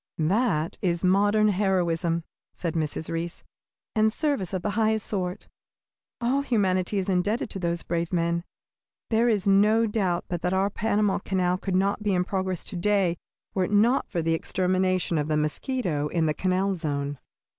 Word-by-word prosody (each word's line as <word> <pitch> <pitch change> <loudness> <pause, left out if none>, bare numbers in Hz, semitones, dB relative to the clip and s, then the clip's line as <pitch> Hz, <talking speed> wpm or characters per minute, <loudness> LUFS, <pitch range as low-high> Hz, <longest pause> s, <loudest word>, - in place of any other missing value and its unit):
"That 170 -1 +1
is 175 -1 0
modern 205 +3 +4
heroism," 175 -4 +1 0.3
said 170 -2 -3
Mrs. 160 -1 -2
Reece, 165 +1 -4 0.5
"and 220 0 +3
service 280 - -1
of 185 -2 -3
the 210 - 0
highest 220 +1 +1
sort. 185 -3 -3 0.7
All 250 +4 +1
humanity 200 -6 +1
is 190 - -1
indebted 205 +5 0
to 195 - -4
those 170 -1 -1
brave 170 0 -2
men. 170 -1 0 0.7
There 230 +2 +3
is 205 -4 0
no 210 +3 +4
doubt 195 -5 0
but 175 -2 -3
that 180 - 0
our 195 +2 +1
Panama 210 -1 +1
Canal 185 -2 0
could 190 -2 -2
not 195 +3 +1
be 205 -2 +1
in 180 - +2
progress 185 -1 -2
to 200 - -6
day 180 -2 +1 0.3
were 190 -2 +1
it 205 - -6
not 225 +6 +3
for 170 - -2
the 165 0 +1
extermination 185 0 0
of 150 - -1
the 155 -1 +1
mosquito 150 - -1
in 165 +1 0
the 155 - +1
canal 185 +4 0
zone. 145 -5 -3
185 Hz, 170 wpm, -26 LUFS, 170-205 Hz, 0.7 s, modern